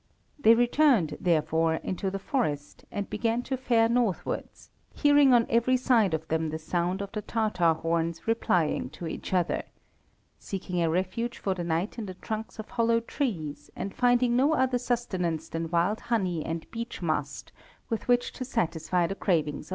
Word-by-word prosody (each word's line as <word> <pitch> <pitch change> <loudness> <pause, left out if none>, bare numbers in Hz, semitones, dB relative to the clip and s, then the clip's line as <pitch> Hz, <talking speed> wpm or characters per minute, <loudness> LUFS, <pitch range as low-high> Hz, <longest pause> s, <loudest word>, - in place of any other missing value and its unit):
They 230 -4 +7
returned, 240 - +3
therefore, 160 -1 +2
into 190 +3 -3
the 195 - -3
forest, 155 - -2
and 200 -1 -3
began 230 +2 -1
to 265 - -2
fare 240 -3 +3
northwards, 235 -5 -2 0.2
hearing 290 -2 +5
on 240 -2 +5
every 235 +2 +3
side 230 -9 +3
of 160 0 -6
them 160 0 0
the 155 - -3
sound 175 +4 -1
of 200 - -8
the 215 - -3
Tatar 205 -7 +1
horns 165 +2 -2
replying 180 - +1
to 175 - -6
each 160 - -5
other; 180 -2 +1 0.8
seeking 180 -2 -3
a 165 - +2
refuge 190 +8 -1
for 195 - -1
the 180 -2 -4
night 170 +7 -2
in 215 - -4
the 185 - -7
trunks 220 +3 -5
of 220 - -7
hollow 230 -1 +2
trees, 170 - -4
and 195 - -5
finding 245 -1 +3
no 275 +5 +4
other 255 -3 +2
sustenance 185 -10 -1
than 165 0 -3
wild 175 +6 +1
honey 185 -9 -1
and 165 0 -4
beach 230 -4 -6
mast 145 -4 -2 0.4
with 225 - -2
which 245 0 +2
to - - -5
satisfy 175 - 0
the 195 - -2
cravings 170 -6 +1
of 150 - -7
hunger. - - -15
195 Hz, 175 wpm, -28 LUFS, 165-235 Hz, 0.8 s, They